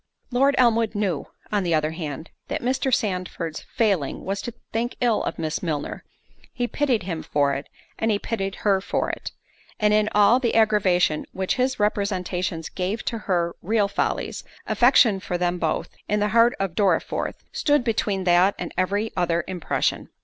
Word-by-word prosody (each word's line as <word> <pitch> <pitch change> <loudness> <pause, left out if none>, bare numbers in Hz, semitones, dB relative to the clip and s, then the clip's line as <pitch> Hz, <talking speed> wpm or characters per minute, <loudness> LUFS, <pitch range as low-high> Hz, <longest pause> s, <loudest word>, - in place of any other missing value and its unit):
Lord 275 +3 +3
Elmwood 230 -3 +3
knew, 195 -7 -1 0.2
on 205 -1 +2
the 170 -3 +1
other 155 0 +1
hand, 160 -1 -6 0.2
that - - -3 0.3
Sandford's 180 -7 -2
failing 195 -11 0
was 195 +1 -2
to 240 - -6 0.2
think 235 +2 -1
ill 240 -3 +2
of - - -3
Miss 160 -1 -2
Milner—he 165 - -5
pitied 260 -8 +1
him 170 -3 -4
for 145 -1 +1
it, 140 +1 -5 0.3
and 225 - +1
he 210 - +3
pitied 195 -3 -3
her 195 -2 +3
for - - -1
it—and 210 -1 -4
in 210 0 +3
all 210 +4 +6
the 240 -3 0
aggravation 190 -8 +3
which 190 +5 -1
his 255 -1 0
representations 185 -5 -1
gave 190 +4 -3
to 230 - -2
her 170 -2 +1
real 210 +1 +2
follies, 200 - -2 0.2
affection 240 -5 +4
for 180 -2 -3
them 175 0 0
both, 160 -2 -1 0.2
in 210 - +2
the 210 0 +1
heart 230 +2 +4
of 195 -3 -1
Dorriforth, 190 -3 0
stood 290 -3 +2
between 210 -4 0
that 180 +2 +4
and - - -5
every 200 +4 0
other 170 -2 +1
impression. 180 -3 -1
195 Hz, 165 wpm, -24 LUFS, 175-225 Hz, 0.3 s, all